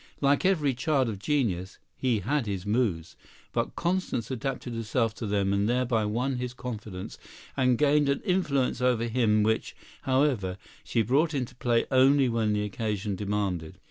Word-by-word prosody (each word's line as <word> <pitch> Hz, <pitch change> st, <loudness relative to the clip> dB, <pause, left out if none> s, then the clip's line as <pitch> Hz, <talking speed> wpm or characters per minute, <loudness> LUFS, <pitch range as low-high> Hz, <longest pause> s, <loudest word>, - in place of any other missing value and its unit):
Like 140 Hz, +4 st, +2 dB
every 155 Hz, -8 st, +2 dB
child 130 Hz, -1 st, +1 dB
of 100 Hz, -3 st, -5 dB
genius, 100 Hz, -8 st, -1 dB, 0.2 s
he 120 Hz, -5 st, 0 dB
had 130 Hz, +3 st, 0 dB
his 95 Hz, -2 st, -3 dB
moods, 105 Hz, -7 st, 0 dB, 0.4 s
but -, -, -1 dB
Constance 175 Hz, -9 st, -1 dB
adapted 130 Hz, -1 st, -3 dB
herself 115 Hz, 0 st, 0 dB
to 110 Hz, 0 st, -5 dB
them 100 Hz, -1 st, +1 dB
and 100 Hz, +2 st, +1 dB
thereby 120 Hz, -3 st, +1 dB
won 125 Hz, +5 st, -1 dB
his 125 Hz, 0 st, -4 dB
confidence 110 Hz, -7 st, -7 dB, 0.4 s
and 125 Hz, -3 st, +3 dB
gained 145 Hz, 0 st, +3 dB
an 140 Hz, -, 0 dB
influence 145 Hz, -10 st, 0 dB
over 125 Hz, -2 st, +2 dB
him 110 Hz, -3 st, +2 dB
which, 110 Hz, +1 st, 0 dB, 0.3 s
however, 130 Hz, -9 st, +1 dB, 0.3 s
she 115 Hz, -, 0 dB
brought 145 Hz, +8 st, +2 dB
into 125 Hz, -3 st, -2 dB
play 120 Hz, -2 st, +1 dB
only 135 Hz, +1 st, +5 dB
when 115 Hz, -3 st, +1 dB
the 105 Hz, 0 st, 0 dB
occasion 105 Hz, -1 st, -2 dB
demanded. 95 Hz, -4 st, -2 dB
120 Hz, 160 wpm, -27 LUFS, 105-135 Hz, 0.4 s, only